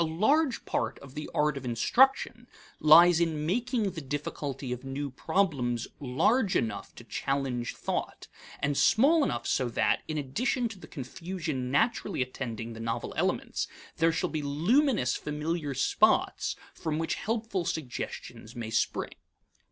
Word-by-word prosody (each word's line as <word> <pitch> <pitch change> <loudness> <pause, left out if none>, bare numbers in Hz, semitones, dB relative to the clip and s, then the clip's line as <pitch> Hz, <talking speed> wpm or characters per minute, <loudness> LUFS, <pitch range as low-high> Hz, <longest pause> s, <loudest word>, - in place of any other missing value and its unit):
A 160 0 -2
large 300 -5 +2
part 115 +2 -1
of 140 -1 -13
the 150 - -6
art 150 -1 +1
of 135 - -6
instruction 240 - +2 0.3
lies 165 +3 +8
in 160 -3 0
making 230 - 0
the 165 - -6
difficulty 140 -1 -4
of 125 - -7
new 135 +1 -4
problems 130 - 0
large 175 - +2
enough 115 - -2
to - - -11
challenge 135 -3 -2
thought, - - -4 0.3
and 140 0 +1
small 285 - +5
enough 120 - -1
so 125 -2 +1
that, 115 - +1
in 155 - -3
addition 235 - 0
to 210 -4 -10
the - - -11
confusion 155 -2 -4
naturally 200 - +1
attending 115 -3 -5
the 115 - -9
novel 115 0 -3
elements, - - -1 0.3
there 165 +1 +4
shall 165 - -1
be 155 - -2
luminous 175 - +2
familiar 150 -1 -3
spots 130 - +2 0.2
from 155 -1 -3
which 165 0 -1
helpful 220 -4 -2
suggestions 125 -6 -5
may 115 -2 -5
spring. 115 - 0
150 Hz, 145 wpm, -29 LUFS, 130-190 Hz, 0.3 s, lies